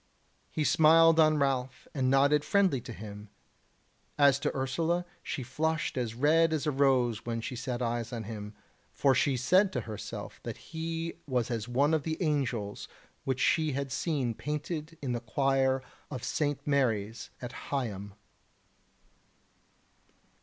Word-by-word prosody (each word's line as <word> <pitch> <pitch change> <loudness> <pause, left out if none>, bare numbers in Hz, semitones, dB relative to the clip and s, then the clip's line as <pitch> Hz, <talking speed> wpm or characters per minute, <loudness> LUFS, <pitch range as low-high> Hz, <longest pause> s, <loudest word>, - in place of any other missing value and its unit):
He 155 - -1
smiled 165 +2 +6
on 155 -1 +5
Ralph 135 -2 -1
and 130 -3 +1
nodded 140 +2 +4
friendly 190 - +2
to 120 - -8
him. 105 -2 -9 0.9
As 140 -1 +5
to 145 0 -2
Ursula, 165 +7 0 0.2
she 150 -5 -4
flushed 155 +5 -1
as 120 -3 -2
red 160 +5 +4
as 155 -1 -1
a 150 - +2
rose 130 -5 +2
when 115 -1 -3
she 120 +2 -5
set 125 0 -3
eyes 120 0 -2
on 115 -2 -4
him, 105 -1 -7 0.4
for 135 -2 +3
she 135 0 +2
said 185 - +4
to 125 - -1
herself 110 -2 -7
that - - -6 0.2
he 165 +1 -3
was 125 -3 0
as 115 -2 -2
one 140 +6 +2
of 160 - +2
the 160 +2 -3
angels 130 - -1 0.4
which 130 -1 -1
she 155 +1 +2
had 140 0 -3
seen 135 -7 -1
painted 150 +4 -4
in 130 - -1
the 120 - -1
choir 135 +2 +1 0.3
of 130 -5 -6
St. 145 -2 -1
Mary's 115 -7 0
at 125 -1 -6 0.2
Higham. 105 -8 -3
135 Hz, 150 wpm, -30 LUFS, 120-155 Hz, 0.9 s, smiled